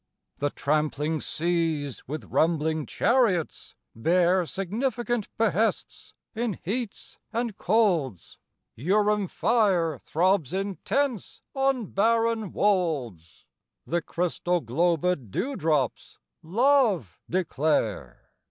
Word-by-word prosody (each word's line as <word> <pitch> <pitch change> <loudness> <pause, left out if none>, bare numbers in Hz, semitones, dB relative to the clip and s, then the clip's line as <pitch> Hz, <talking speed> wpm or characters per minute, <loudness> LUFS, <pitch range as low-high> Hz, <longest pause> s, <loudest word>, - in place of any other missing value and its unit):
The 145 - +1
trampling 150 +1 -1
seas 160 -5 -1
with 150 +4 -5
rumbling 160 -1 +1
chariots 225 - +1 0.2
bear 175 +7 +2
Significant 235 - -2
behests 225 0 -1 0.2
in 230 -3 -2
heats 220 +3 -5
and 230 -2 -2
colds, 175 - 0 0.4
Urim 205 - +1
fire 185 - +1
throbs 175 -2 +1
intense 205 +5 -2
on 270 -3 +1
barren 225 0 +1
wolds 145 - -1 0.4
The 170 +1 -1
crystal 175 +1 -1
globëd 165 - 0
dew 265 - -2
drops 150 - -1 0.2
Love 210 - +2
declare! 145 - -1
180 Hz, 90 wpm, -26 LUFS, 155-220 Hz, 0.4 s, bear